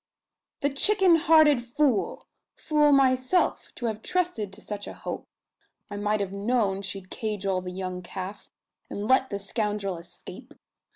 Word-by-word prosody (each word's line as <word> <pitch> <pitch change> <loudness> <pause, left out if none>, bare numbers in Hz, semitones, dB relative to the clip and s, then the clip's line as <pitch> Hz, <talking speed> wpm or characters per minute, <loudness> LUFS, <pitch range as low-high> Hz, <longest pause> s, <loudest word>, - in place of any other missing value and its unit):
"The 285 0 +1
chicken 370 +4 +4
hearted 315 -5 +5
fool! 245 -1 0 0.3
Fool 300 -1 +3
myself, 265 +4 +2
to 240 - -5
have 220 -1 -2
trusted 345 - -1
to 195 - -13
such 210 -1 -6
a - - -7
hope! - - -6 0.6
I 205 - -4
might 210 +1 0
have 195 -1 -3
known 200 -1 0
she'd 195 -1 -7
cajole 200 -4 -2
the 180 - -6
young 185 0 -5
calf, 190 +3 -7 0.4
and 205 +1 -4
let 260 +1 +4
the 200 - -2
scoundrel 200 -2 -2
escape. 170 +1 -12
215 Hz, 150 wpm, -26 LUFS, 195-275 Hz, 0.6 s, hearted